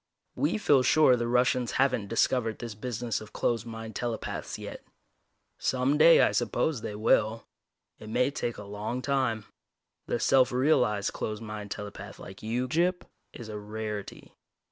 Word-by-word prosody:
We 290 - 0
feel 145 -10 +4
sure 130 0 +5
the 120 -1 -2
Russians 125 0 +2
haven't 130 -6 +1
discovered 115 0 +1
this 115 -2 -6
business 120 +1 -3
of 110 - -12
closed 120 0 -1
mind 115 -1 -7
telepaths 120 -2 -4
yet. - - -8 0.8
Some 130 +3 +1
day, 165 +1 +8
I - - +4
suppose, 150 -8 0
they 105 - -5
will. 110 +1 +2 0.5
It 110 - -10
may 125 +4 +2
take 120 -5 -3
a 105 - -7
long 105 +5 -4
time. 130 -6 0 0.6
The 120 - -1
self 130 +1 +4
realized 125 -6 +2
closed 110 +1 -4
mind 105 -1 -6
telepath 100 -1 -7
like 95 - -11
you, 120 +4 -1
Gyp, 175 +6 +1 0.3
is 120 - -9
a 105 -1 -6
rarity. 105 -1 -6
115 Hz, 155 wpm, -28 LUFS, 110-130 Hz, 0.8 s, day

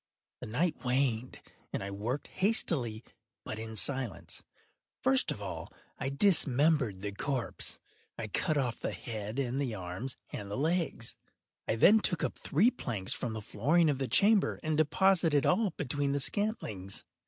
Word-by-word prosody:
The - - -7
night 155 +10 -1
waned, 125 -1 0 0.3
and - - -3
I 100 - -5
worked 115 +8 -3
hastily, 140 - 0 0.4
but 110 - -5
in 110 0 -6
silence. 130 -1 -1 0.6
First 130 0 +3
of - - -1
all - - -6 0.3
I 135 - -1
dismembered 140 - +3
the 105 0 -3
corpse. 130 +4 -3 0.4
I 115 - -4
cut 155 - 0
off 125 -4 -1
the - - -3
head 110 0 -5
and 135 0 -1
the 125 -6 -2
arms 95 +7 -5 0.2
and 100 -1 -5
the 100 - -3
legs. 160 -5 -1 0.5
I - - +1
then 210 - +7
took 175 -5 0
up - - -2
three 205 - +3
planks 110 - -2
from 115 - -3
the 110 -1 -5
flooring 150 +11 +2
of 135 - -3
the 135 - -1
chamber, 205 - +4
and 155 -1 0
deposited 160 -1 +3
all 205 +3 +3
between 140 0 -1
the 145 - 0
scantlings. 135 - -2
135 Hz, 160 wpm, -31 LUFS, 110-160 Hz, 0.6 s, then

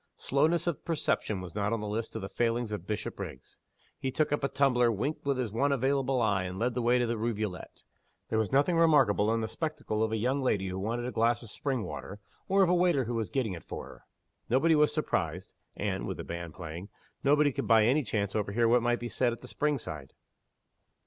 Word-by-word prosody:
Slowness 155 +5 +1
of 170 -4 -2
perception 125 - -1
was 90 -3 -8
not 105 0 -1
on 115 - 0
the 105 - -4
list 110 +2 -3
of 110 - -4
the - - -3
failings 115 +1 -1
of 100 -3 -5
Bishopriggs. 105 -10 -6 0.4
He 135 - -2
took 150 +3 0
up 145 - 0
a - - +3
tumbler, 125 -4 +3
winked 140 +8 -3
with 140 -2 +2
his 125 -5 -2
one 140 +6 +1
available 135 0 +1
eye, 100 -4 +2
and 90 +1 -5
led 120 +4 0
the 125 - -1
way 120 +1 +3
to 120 - +2
the 115 -1 -2
rivulet. 105 -5 -4 0.5
There 110 - +1
was 110 - -1
nothing 145 +6 +3
remarkable 145 -11 +4
in 115 0 +1
the 110 - -1
spectacle 110 -4 -3
of 110 0 +1
a 110 - 0
young 130 +6 0
lady 100 -7 0
who 95 +1 -4
wanted 115 +5 -2
a - - -3
glass 115 0 +1
of 110 - -10
spring 135 -6 -2
water, 100 0 -7 0.3
or 195 +1 +4
of 180 - +3
a - - +4
waiter 175 -6 +3
who 120 +1 -4
was 115 -3 -2
getting 125 -8 -1
it 85 - -8
for - - -7
her. - - -13 0.5
Nobody 145 +7 +4
was 150 -1 +4
surprised; 90 - -2 0.2
and - - -2
(with - - -4
the - - -5
band 85 -2 -6
playing) 85 +3 -7 0.3
nobody 145 +1 +4
could - - -3
by 115 -2 +6
any 135 +7 +3
chance 100 -5 -2
overhear 110 +2 +1
what 120 +1 +4
might 120 0 +1
be 120 - -4
said 120 0 +1
at 115 - -10
the - - -9
spring 150 -1 0
side. 75 - -7
120 Hz, 230 wpm, -30 LUFS, 105-140 Hz, 0.5 s, by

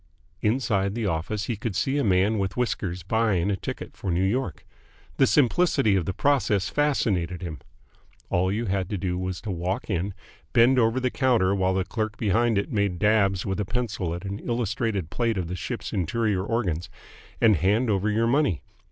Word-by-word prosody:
Inside 105 -4 +1
the 115 -2 -2
office 95 +4 -2
he 120 -1 -2
would 110 -4 -3
see 135 +8 +1
a - - +1
man 100 +2 +2
with 95 +2 -2
whiskers 95 -8 -2
buying 105 -2 +1
a - - +1
ticket - - -6
for 95 - -5
New 90 +2 +1
York. 100 - -1 0.5
The 135 - +5
simplicity 140 - +3
of 90 -4 +1
the - - -1
process 105 -7 +1
fascinated 95 - 0
him. 80 -4 -5 0.7
All 90 +1 +2
you 110 +4 -1
had 95 -3 -1
to 105 - -2
do 90 -1 -2
was 95 -1 -3
to 110 - -4
walk 90 +4 -3
in, 95 +1 -2 0.4
bend 125 +3 +5
over 115 +2 +2
the 130 -1 0
counter 120 -8 +2
while 95 -1 +1
the 95 -1 0
clerk 110 -1 -3
behind 115 +1 +2
it 100 - -1
made 100 -4 0
dabs 100 -2 +2
with 95 +1 -2
a - - +1
pencil 100 -5 -2
at 85 - -6
the 100 +1 -4
illustrated 115 -6 -1
plate 115 -3 0
of 90 -3 -2
the 90 - -4
ship's 115 +7 -5
interior 100 +1 0
organs, 95 -7 -1 0.5
and 110 -5 +5
hand 105 - +2
over 100 +1 +1
your 110 +2 +2
money. 120 - +1
100 Hz, 190 wpm, -25 LUFS, 95-115 Hz, 0.7 s, The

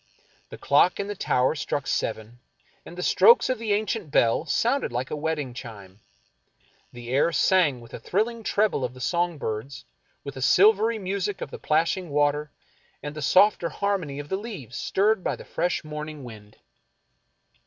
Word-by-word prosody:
The - - -9
clock 145 +6 +3
in 200 - -1
the 205 0 -5
tower 130 -7 +1
struck 145 -2 -3
seven, 110 -1 -3 0.5
and 175 - -11
the 180 - -4
strokes 465 - +5
of 255 - -2
the 225 -2 -3
ancient 210 -3 -2
bell 130 +4 +2
sounded 240 - 0
like 125 +2 -3
a - - -1
wedding 150 -4 -3
chime. 105 -6 -10 0.9
The 120 -1 -10
air 140 +5 +2
sang 155 -5 +2
with 115 - -14
the - - -7
thrilling 225 +4 -1
treble 210 -8 0
of 125 0 -4
the - - -12
song 170 +4 -1
birds, 115 +2 -5 0.4
with 140 - -7
the 130 - -8
silvery 215 - +4
music 200 0 -3
of - - -6
the - - -8
plashing 165 +3 0
water 145 +1 +1 0.5
and 145 0 -5
the 155 - -7
softer 185 +4 +4
har 200 0 -1
mony 145 -5 -7
of 145 0 -7
the 190 - -1
leaves 195 - -8
stirred 200 - +1
by - - -1
the - - -12
fresh 175 0 -2
morning 150 -1 -7
wind. 110 -3 -12
155 Hz, 175 wpm, -25 LUFS, 130-200 Hz, 0.9 s, strokes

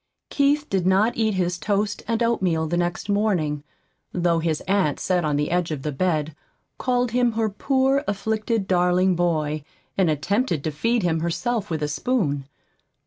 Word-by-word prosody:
Keith 290 +1 +2
did 185 -2 0
not 200 +5 +3
eat 220 -3 +1
his 180 -1 -1
toast 205 +1 -1
and 230 +1 +1
oatmeal 185 -9 +1
the 165 +2 -1
next 175 +2 -1
morning, 185 -9 0 0.5
though 170 -2 +1
his 160 -2 -1
aunt 190 -7 +1
sat 180 -2 +1
on 150 -2 0
the 150 +2 0
edge 175 -1 +1
of 150 -4 -4
the 150 - -2
bed, 155 -1 -1 0.4
called 250 -2 +1
him 245 -1 +2
her 220 -1 0
poor, 270 +5 +1
afflicted, 215 +1 -1
darling 180 0 +3
boy, 155 -4 0 0.3
and 190 -4 +2
attempted 170 - 0
to 155 - -1
feed 230 +9 0
him 165 -2 +1
herself 210 +6 -1
with 160 -2 -2
a - - +1
spoon. 145 - -1
185 Hz, 170 wpm, -23 LUFS, 160-220 Hz, 0.5 s, not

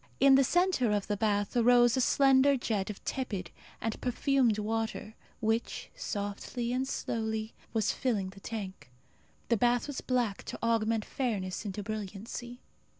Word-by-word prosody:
In 275 0 +7
the 270 +1 +7
centre 350 - +2
of 205 -1 0
the 210 - -1
bath 205 +1 0
arose 240 0 +5
a 260 - +2
slender 270 +1 +5
jet 215 -5 -1
of 210 - -8
tepid 200 -10 -3 0.3
and 225 -1 -3
perfumed 250 -2 +2
water, 220 0 -2 0.3
which, 225 +1 -1
softly 210 +4 -3
and 260 +1 0
slowly, 220 -3 -2 0.2
was 220 -3 +1
filling 210 -7 -1
the 195 - -14
tank. 195 - -6 0.6
The 235 - +3
bath 240 +2 +2
was 285 -3 -5
black 245 -6 0
to - - -5
augment 225 -1 +1
fairness 210 -7 -2
into 205 0 -4
brilliancy. 215 +4 -6
225 Hz, 150 wpm, -30 LUFS, 210-250 Hz, 0.6 s, In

